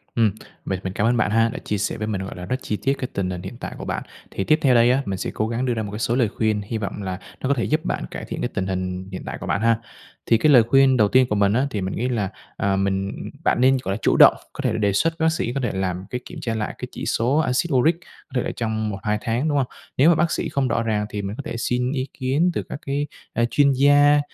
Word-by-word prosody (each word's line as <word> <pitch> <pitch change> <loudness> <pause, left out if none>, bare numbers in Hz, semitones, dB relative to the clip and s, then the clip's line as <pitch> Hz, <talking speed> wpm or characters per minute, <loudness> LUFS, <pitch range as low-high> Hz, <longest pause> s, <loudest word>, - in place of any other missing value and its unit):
Ừm, 115 -3 +3 0.3
mình 95 - -2
mình 95 - -3
cảm 105 +3 +1
ơn 120 +1 +2
bạn 115 - +1
ha 115 +1 +3
đã 120 - -6
chia 105 - -2
sẻ 100 - -2
với 110 -1 -3
mình, 100 -3 -2
gọi 95 - -7
là, 90 - -7
rất 125 - -1
chi 105 - -2
tiết 135 - +3
cái 130 - -3
tình 95 -2 -1
hình 90 -1 -4
hiện 95 +6 -8
tại - - -6
của - - -7
bạn, - - -3 0.3
thì 95 - -2
tiếp 155 +9 +3
theo 130 -3 +4
đây 120 +1 +5
á, 135 +2 +2
mình 95 -1 -2
sẽ - - -3
cố 110 - -1
gắng 120 +3 -2
đưa 125 - +1
ra 110 -1 -2
một 100 - -6
cái 105 - -5
số 115 - 0
lời 120 -4 +2
khuyên, 110 0 0
hi 105 +3 -4
vọng 105 -1 -4
là 95 -1 -4 0.2
nó 130 - -1
có - - +5
thể 120 - -1
giúp 155 +1 0
bạn - - -2
cải - - -6
thiện - - -5
cái - - -1
tình 95 0 -2
hình 95 0 -3
hiện 95 - -5
tại - - -5
của - - -6
bạn 100 - 0
ha. 115 0 +3 0.5
Thì 115 - +4
cái 155 +5 +4
lời 125 -5 +8
khuyên 135 +2 +4
đầu 105 -3 +4
tiên 130 +4 +4
của 105 - +1
mình 100 0 +3
á, 130 +5 +2
thì 105 -7 -3
mình 95 0 -3
nghĩ 125 +3 -1
là, 105 -6 -1 0.3
à, 100 0 +1
mình 95 0 0 0.3
bạn - - +2
nên, 130 +1 +5
gọi 95 - -1
là, - - -2
chủ - - +3
động, - - +9 0.2
có - - -5
thể - - +2
là, - - -1
đề 100 -2 +1
xuất 165 +12 +2
với 160 - +1
bác - - +5
sĩ, 120 -7 -2
có 135 - -2
thể 120 - -1
làm 95 -1 -2
cái 125 - -4
kiểm 170 - -9
tra 115 -6 -2
lại 105 -1 -3
cái - - -6
chỉ - - -6
số 125 +6 +1
axit 155 +3 +1
uric, 150 +6 +4
có - - -21
thể 125 - +2
là - - -2
trong 110 -2 -2
1-2 105 +1 -1
tháng, 120 +5 -1
đúng 145 - +1
hông? 135 -3 +1 0.3
Nếu 145 +5 +6
mà 170 - +5
bác 165 +1 +1
sĩ - - -1
không 140 -2 0
rõ 115 -1 0
ràng 105 -2 0
thì 105 - -4
mình 100 +1 -4
có 140 - -6
thể 115 - -4
xin 125 +2 0
ý 135 -2 -2
kiến 140 +7 +2
từ - - -2
các - - -5
cái, 140 +1 -1 0.3
a, 115 - +1
chuyên 140 -1 +4
gia, 145 +2 +5
115 Hz, 315 wpm, -23 LUFS, 100-130 Hz, 0.5 s, động